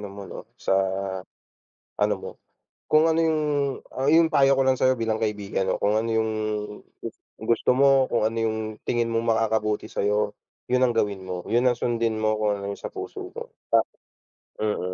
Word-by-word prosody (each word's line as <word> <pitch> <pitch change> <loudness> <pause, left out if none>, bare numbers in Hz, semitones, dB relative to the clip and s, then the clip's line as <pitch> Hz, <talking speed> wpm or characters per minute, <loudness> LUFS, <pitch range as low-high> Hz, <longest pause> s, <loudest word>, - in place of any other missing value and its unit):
ano 105 - -6
mo 100 0 -9
'no, - - -10
sa - - -1 1.3
ano - - +2
mo. - - -6 0.6
Kung 155 +1 +5
ano 165 0 +3
yung 160 -1 +2 0.5
ah, 135 +2 0
yung 165 +1 +6
payo 135 -1 +5
ko 135 - +3
lang 130 - +4
sayo 130 0 +2
bilang 110 -1 -1
kaibigan 100 -3 -1
'no, - - +1
kung 105 +1 +1
ano 115 - -3
yung 110 0 +1 0.7
gus - - -5 0.2
gusto 115 +3 +1
mo, 135 -1 +5
kung 115 - +1
ano 115 +1 -1
yung 110 -1 0 0.3
tingin 115 -1 0
mong 115 - +1 0.2
makakabuti 110 -1 0
sayo, 105 +1 0 0.3
yun 125 +1 +1
ang 120 -3 +2
gawin 100 -3 0
mo, 90 -1 -6
yun 120 +4 +3
ang 120 - 0
sundin 115 -2 0
mo 110 0 0
kung 105 -1 +1
ano 100 0 -4
yung - - -11
sa - - -5
puso - - -7
mo. - - -8 0.2
Pa - - +4 0.8
mm. 90 -4 -1
115 Hz, 190 wpm, -25 LUFS, 105-130 Hz, 1.3 s, yung